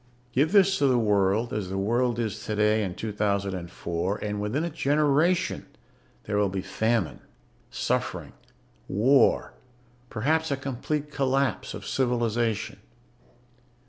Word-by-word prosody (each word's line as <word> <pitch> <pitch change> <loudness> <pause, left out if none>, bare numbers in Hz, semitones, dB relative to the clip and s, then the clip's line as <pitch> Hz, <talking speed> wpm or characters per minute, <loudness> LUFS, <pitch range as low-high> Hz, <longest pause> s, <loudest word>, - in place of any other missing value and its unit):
"Give 140 +6 +2
this 195 -1 +4
to 140 - +4
the 130 -2 +3
world, 105 +1 +2
as 100 -4 -3
the 95 - -3
world 120 +5 +1
is 110 -1 -3
today 105 0 +1
in 90 -3 -4
2004, 100 -3 -2
and 105 0 -2
within 115 +9 -1
a 170 - -1
generation 150 +3 +1 0.6
there 105 -1 -2
will 105 -1 +2
be 95 -1 -3
famine, 110 -3 -1 0.5
suffering, - - -2 0.5
war. 120 +6 +3 0.6
Perhaps 155 +8 0
a 140 - 0
complete 140 +3 -3
collapse 135 -1 0
of - - -8
civilization. 115 -3 -1
115 Hz, 120 wpm, -26 LUFS, 105-140 Hz, 0.6 s, this